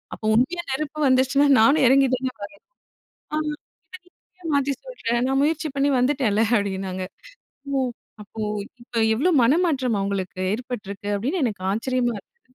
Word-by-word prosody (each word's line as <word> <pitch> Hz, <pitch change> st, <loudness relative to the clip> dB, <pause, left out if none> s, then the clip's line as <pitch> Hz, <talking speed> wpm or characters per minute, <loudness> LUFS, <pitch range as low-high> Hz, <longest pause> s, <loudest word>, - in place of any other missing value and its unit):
அப்போ -, -, -9 dB
உண்மையா 310 Hz, +9 st, +1 dB
நெருப்பு 305 Hz, +2 st, -3 dB
வந்துச்சுனா, 265 Hz, +2 st, +3 dB
நானும் 275 Hz, +6 st, +5 dB
இறங்கி 270 Hz, +2 st, +5 dB
தானே 255 Hz, 0 st, -3 dB
வரணும்! 205 Hz, -, -8 dB, 0.8 s
அ -, -, +2 dB, 0.6 s
அத -, -, -23 dB
இப்ப -, -, -85 dB, 0.2 s
நீ 365 Hz, -, -34 dB
ஏன் 330 Hz, -, -4 dB
மாத்தி 280 Hz, 0 st, +1 dB
சொல்ற? -, -, -8 dB, 0.2 s
நான் 270 Hz, 0 st, +2 dB
முயற்சி 315 Hz, +1 st, 0 dB
பண்ணி 280 Hz, +1 st, +2 dB
வந்துட்டேன்ல!" 245 Hz, -5 st, +2 dB
அப்டின்னாங்க. 190 Hz, -2 st, -3 dB, 0.7 s
"ஓ! -, -, +2 dB, 0.5 s
அப்போ 215 Hz, +2 st, -9 dB, 0.4 s
இப்ப 240 Hz, 0 st, -14 dB, 0.2 s
எவ்வளோ 345 Hz, +10 st, +2 dB
மனமாற்றம் 265 Hz, -, +2 dB
அவுங்களுக்கு 195 Hz, -2 st, -3 dB
ஏற்பட்டிருக்கு!" 210 Hz, -4 st, -6 dB
அப்டின்னு 285 Hz, -, -2 dB
எனக்கு 205 Hz, -5 st, -4 dB
ஆச்சரியமா 240 Hz, +2 st, 0 dB
இருந்தது. 255 Hz, -, -19 dB
255 Hz, 150 wpm, -23 LUFS, 215-290 Hz, 0.8 s, நானும்